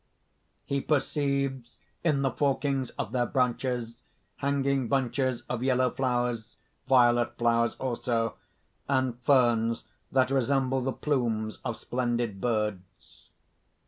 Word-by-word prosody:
_ 140 - +1
_He - - -27
perceives 140 -4 0 0.3
in 150 -5 +2
the 135 - +2
forkings 135 -2 0
of 105 - -3
their 120 -1 +1
branches, 125 -2 -1 0.4
hanging 140 -2 0
bunches 130 -1 0
of 120 -1 -4
yellow 130 -1 +2
flowers, 120 -3 -1 0.3
violet 120 -2 +4
flowers 115 -1 +2
also, 120 -3 -1 0.5
and 130 -3 +1
ferns 120 -3 +3 0.3
that 130 -1 +3
resemble 135 0 +1
the 135 +1 -1
plumes 115 -7 -1
of 120 -3 -3
splendid 120 -5 -2
birds. 105 -6 -3
125 Hz, 110 wpm, -28 LUFS, 120-135 Hz, 0.5 s, violet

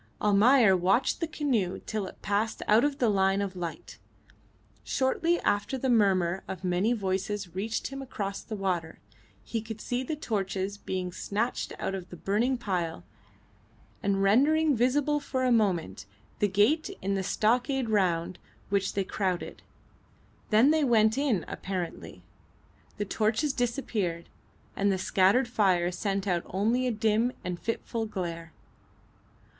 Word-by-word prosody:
Almayer 210 +1 +5
watched 185 +7 +2
the 330 - -1
canoe 250 - -1
till 215 -3 -3
it - - -13
passed 205 +3 -1
out 215 +3 +5
of 290 -1 0
the 245 - +2
line 195 -1 +2
of 195 -2 -3
light. 175 -2 -6 0.8
Shortly 330 +6 +1
after 205 +6 0
the 260 0 0
murmur 190 -5 +2
of 190 -1 -6
many 185 +5 +1
voices 195 -3 -2
reached 210 +4 -2
him 275 0 -6
across 200 -7 -4
the 220 - -6
water. 180 -5 -2 0.5
He 225 - -3
could 225 0 -7
see 245 +3 -2
the 280 +4 -3
torches 200 -6 -3
being 185 -2 -3
snatched 215 +7 -2
out - - -3
of 190 -2 -6
the - - -9
burning 220 +9 0
pile, 175 - -3 1.0
and 195 -1 +1
rendering 290 +9 +4
visible 285 +5 +2
for 260 -2 -2
a 255 - +2
moment 185 - +1 0.3
the 205 - +3
gate 215 - +2
in 195 +1 0
the 195 - 0
stockade 245 +6 +1
round 185 -4 0 0.3
which 200 -1 0
they 200 - 0
crowded. 185 -2 -3 0.9
Then 230 +7 +5
they 315 -1 +2
went 220 -4 +4
in 265 - 0
apparently. 185 -3 -5 0.7
The 205 - -2
torches 225 +8 0
disappeared, 225 -9 -2 0.5
and 200 0 +2
the 190 - 0
scattered 195 +7 +3
fire 185 -7 +2
sent 195 +1 -2
out 175 -3 +1
only 230 +7 +1
a - - +1
dim 220 +2 +1
and 180 -2 -4
fitful 230 0 -3
glare. 170 -5 -5
205 Hz, 145 wpm, -28 LUFS, 190-245 Hz, 1.0 s, Almayer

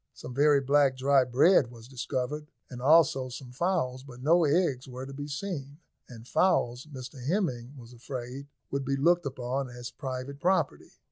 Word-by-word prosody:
Some 125 - -8
very 145 +1 +4
black 140 -1 +3
dry 135 0 +4
bread 130 +2 +4
was 115 -1 -13
discovered, 130 +3 -3 0.2
and 125 -1 -7
also 135 -3 +4
some 125 0 -9
fowls, 130 -4 -1
but 125 -3 -12
no 165 +3 +4
eggs 145 -4 +1
were 130 +1 -7
to 135 - -9
be 145 +1 -6
seen; 145 -2 -5 0.3
and 120 -1 -11
fowls, 130 -8 +1
Mr 130 -1 -8
Hemming 140 - -1
was 120 -1 -12
afraid, 125 +2 -7 0.2
would 140 0 -1
be 135 +1 0
looked 170 +3 +3
upon 130 0 -3
as 120 0 -8
private 135 0 -6
property. 185 +4 0
135 Hz, 165 wpm, -29 LUFS, 125-145 Hz, 0.3 s, very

